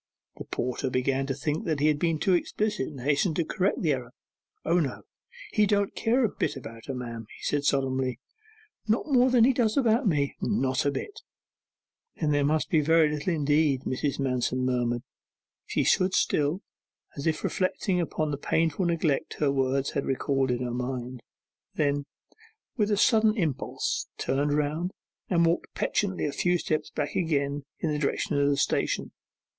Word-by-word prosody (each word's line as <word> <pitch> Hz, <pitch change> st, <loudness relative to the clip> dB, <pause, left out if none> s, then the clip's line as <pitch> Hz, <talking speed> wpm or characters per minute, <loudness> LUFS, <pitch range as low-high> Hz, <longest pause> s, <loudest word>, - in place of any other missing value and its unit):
The -, -, -7 dB
porter 125 Hz, 0 st, -2 dB
began 135 Hz, +2 st, 0 dB
to 135 Hz, -, -1 dB
think 150 Hz, -, -2 dB
he 145 Hz, -, +2 dB
had 150 Hz, -1 st, +2 dB
been 165 Hz, -1 st, +1 dB
too 185 Hz, +4 st, +2 dB
explicit, 210 Hz, -2 st, 0 dB
and 140 Hz, -4 st, -8 dB
hastened 145 Hz, +5 st, +1 dB
to 170 Hz, -, 0 dB
correct 195 Hz, +2 st, 0 dB
the 155 Hz, -4 st, +3 dB
error. 125 Hz, -2 st, -5 dB, 0.5 s
'O 170 Hz, +2 st, +3 dB
no, 140 Hz, -6 st, -2 dB, 0.5 s
he 210 Hz, -1 st, +4 dB
don't 200 Hz, -1 st, +1 dB
care 240 Hz, +3 st, +2 dB
a -, -, +1 dB
bit -, -, -1 dB
about 115 Hz, -3 st, -10 dB
her, 135 Hz, -, -3 dB
ma'am,' 115 Hz, -3 st, -6 dB
he -, -, -15 dB
said 145 Hz, -1 st, 0 dB
solemnly. 130 Hz, -3 st, 0 dB, 0.7 s
'Not 220 Hz, +2 st, +1 dB
more 255 Hz, -1 st, +5 dB
than 245 Hz, -2 st, +5 dB
he 260 Hz, +3 st, +5 dB
does 230 Hz, -2 st, +1 dB
about 235 Hz, -2 st, +3 dB
me?' 145 Hz, -5 st, +1 dB
'Not 135 Hz, -9 st, +1 dB
a -, -, +2 dB
bit.' 410 Hz, -, -6 dB, 1.0 s
'Then 155 Hz, -3 st, +1 dB
that 145 Hz, -1 st, +2 dB
must 155 Hz, +2 st, 0 dB
be 160 Hz, -, +4 dB
little 155 Hz, +1 st, +3 dB
indeed,' 145 Hz, -3 st, +2 dB
Mrs. 140 Hz, +2 st, -1 dB
Manston 130 Hz, -1 st, 0 dB
murmured. 120 Hz, -1 st, 0 dB, 0.6 s
She -, -, 0 dB
stood 185 Hz, 0 st, +3 dB
still, 150 Hz, +7 st, +1 dB, 0.5 s
as 140 Hz, +2 st, -3 dB
if 160 Hz, -1 st, 0 dB
reflecting 185 Hz, 0 st, 0 dB
upon 155 Hz, -2 st, -2 dB
the 145 Hz, -, -2 dB
painful 160 Hz, +4 st, 0 dB
neglect 165 Hz, -4 st, 0 dB
her 145 Hz, -2 st, +1 dB
words 135 Hz, 0 st, 0 dB
had 140 Hz, -, -2 dB
recalled 135 Hz, 0 st, 0 dB
to 125 Hz, -, +1 dB
her 125 Hz, 0 st, -3 dB
mind; 125 Hz, 0 st, -4 dB, 0.5 s
then, 145 Hz, -1 st, +1 dB, 0.7 s
with 210 Hz, -3 st, +1 dB
a 205 Hz, -, +2 dB
sudden 220 Hz, 0 st, +4 dB
impulse, 155 Hz, -, -1 dB
turned 140 Hz, +2 st, 0 dB
round, 150 Hz, +5 st, -1 dB, 0.4 s
and 170 Hz, -2 st, +3 dB
walked 165 Hz, +1 st, -1 dB
petulantly 190 Hz, -5 st, 0 dB
a 145 Hz, -, -1 dB
few 175 Hz, +4 st, +1 dB
steps 155 Hz, -2 st, -2 dB
back 145 Hz, -1 st, -3 dB
again 145 Hz, -4 st, 0 dB, 0.2 s
in 160 Hz, -, 0 dB
the 150 Hz, -, -1 dB
direction 145 Hz, 0 st, 0 dB
of 140 Hz, 0 st, +3 dB
the 140 Hz, -, +1 dB
station. -, -, 0 dB
150 Hz, 175 wpm, -27 LUFS, 135-180 Hz, 1.0 s, more